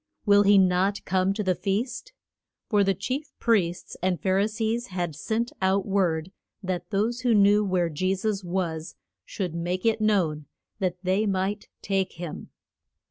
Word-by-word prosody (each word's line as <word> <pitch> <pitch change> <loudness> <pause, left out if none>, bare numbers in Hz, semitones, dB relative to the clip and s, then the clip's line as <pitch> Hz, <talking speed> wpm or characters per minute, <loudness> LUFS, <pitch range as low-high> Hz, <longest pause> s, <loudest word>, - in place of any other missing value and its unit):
will 205 -1 +6
he 205 0 +5
not 190 +2 +2
come 190 0 +1
to 210 +2 -2
the 185 -1 +2
feast? 235 - -3 0.6
For 205 -3 +3
the 195 0 +2
chief 270 - -4
priests 180 -7 0
and 180 -2 0
Phar 190 +5 +1
i 200 - +3
sees 225 +2 -2
had 175 -4 -3
sent 225 +8 -2
out 190 +1 +2
word 185 -4 0 0.3
that 180 -2 -3
those 220 +4 0
who 240 -2 +2
knew 205 +1 +5
where 185 -3 +1
Je 185 +5 0
sus 200 0 -2
was 170 -3 -3 0.3
should 185 -5 -4
make 175 +3 -3
it 225 -1 +2
known, 170 -9 +1 0.3
that 185 -2 -1
they 190 +4 +1
might 195 +2 -1 0.2
take 195 -1 0
him. 170 -2 -7
195 Hz, 165 wpm, -26 LUFS, 180-210 Hz, 0.6 s, will